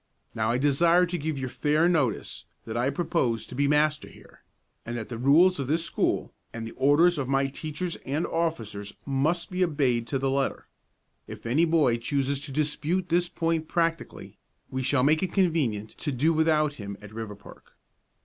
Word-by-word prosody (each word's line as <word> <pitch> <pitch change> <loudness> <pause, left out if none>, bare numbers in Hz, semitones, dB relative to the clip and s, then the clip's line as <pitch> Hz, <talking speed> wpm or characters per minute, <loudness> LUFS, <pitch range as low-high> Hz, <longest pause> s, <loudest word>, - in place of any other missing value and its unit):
Now 110 0 0
I 120 - +2
desire 165 +6 +4
to 180 +1 -4
give 155 -2 -3
you 130 -1 -3
fair 150 +5 +1
notice 150 -10 -1 0.2
that 110 - -6
I 120 +3 +1
propose 140 -6 -1
to - - -11
be 140 +3 +1
master 150 +1 +2
here, - - -18 0.4
and 120 +1 -5
that 110 - -6
the 120 - -5
rules 160 +8 +5
of 135 - -2
this 165 +3 0
school, - - -1 0.2
and 115 -1 -6
the 115 - -7
orders 150 +5 +3
of 135 - -2
my 135 0 +2
teachers 155 +5 -4
and 145 +5 -2
officers, 115 -12 -3
must 150 +7 0
be 185 0 +1
obeyed 135 -8 +1
to 135 - -1
the 135 0 0
letter. 135 0 -1 0.6
If - - -10
any 140 +9 +3
boy 155 -8 +3
chooses 135 +3 -1
to 145 - -8
dispute 155 +5 -1
this 175 +1 +2
point 165 -2 -1
practically, 165 -1 -2 0.3
we 130 - -2
shall 130 0 +2
make 155 +3 +3
it 185 -2 -2
convenient 145 - +1
to 145 - -2
do 145 +6 +2
without 155 -2 +2
him 100 -1 -6
at 105 0 -12
Riverpark. 105 -2 -10
145 Hz, 185 wpm, -27 LUFS, 125-165 Hz, 0.6 s, rules